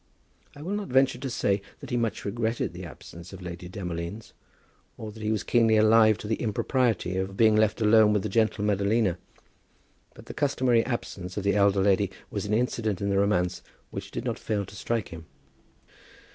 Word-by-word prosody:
I 145 - -10
will 180 - -4
not 205 -1 -3
venture 130 -1 +3
to 135 - -4
say 100 -4 0 0.2
that - - -10
he - - 0
much 115 -4 -1
regretted 110 +2 -2
the - - -7
absence 85 +3 -11
of 95 - -9
Lady 90 0 -7
Demolines, 90 +2 -6 0.6
or 110 -1 -7
that 110 +1 -12
he 105 0 -1
was 110 - -1
keenly 115 -2 +3
alive 110 0 +5
to 110 - -8
the 110 - -1
impropriety 110 -4 0
of 95 +1 -3
being 110 -2 +5
left 110 +1 +2
alone 110 0 +6
with 105 -2 +1
the - - -1
gentle 110 0 +1
Madalina; 100 -1 +1 1.0
but - - -13
the - - -8
customary 130 -5 +2
absence 95 -7 -5
of 100 - -2
the 100 - +2
elder 100 -1 +3
lady 100 0 +3 0.2
was 100 0 -3
an 105 - -1
incident 110 -4 -1
in 100 0 -1
the 100 - +2
romance 90 -3 +1 0.3
which - - -6
did - - -5
not - - -2
fail 105 -2 -2
to 100 - -13
strike 115 +1 -2
him. 80 -1 -10
105 Hz, 195 wpm, -27 LUFS, 95-115 Hz, 1.0 s, alone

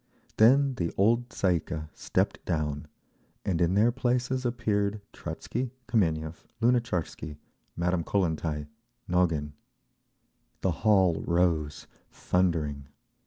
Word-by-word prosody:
Then 135 +5 +6
the 85 -2 -1
old 115 +4 +3
Tsay 90 -5 +2
ee - - -2
kah 80 -1 -5
stepped - - -1
down, 75 -2 -2 0.6
and 90 -3 0
in 85 +2 +3
their 110 +4 +5
places 125 +1 0
appeared 105 -4 0
Trotzky, 125 +2 -4 0.2
Kameniev, 80 -7 0
Lunatcharsky, 115 -11 0 0.4
Madame 85 0 0
Kollentai, 80 -5 -1 0.4
Nogin…. 85 -5 +1 1.1
The 95 - +2
hall 95 -2 +3
rose, 85 -4 +1 0.2
thundering. 80 -6 0
90 Hz, 105 wpm, -28 LUFS, 80-115 Hz, 1.1 s, Then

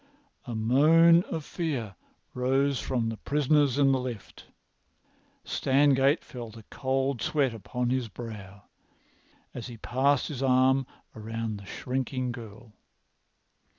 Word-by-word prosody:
A 120 -3 -5
moan 155 +9 +5
of 160 -3 -5
fear 135 - -3 0.4
rose 135 +2 +1
from 120 -3 -1
the 115 - -5
prisoners 145 -1 +2
in 140 -1 +4
the 135 - +2
lift. 125 -5 -7 1.0
Stangate 140 +1 +3
felt 115 -3 -9
a 110 - -12
cold 135 -1 -1
sweat 140 -5 +1
upon 120 +3 -3
his 130 -2 0
brow 105 -4 -9 0.9
as 120 - -6
he 120 -2 -9
passed 130 +4 +1
his 140 -4 -5
arm 130 0 +3 0.3
round 110 -1 -5
the 100 - -12
shrinking 130 +1 -3
girl. 115 -1 -11
130 Hz, 120 wpm, -28 LUFS, 115-140 Hz, 1.0 s, moan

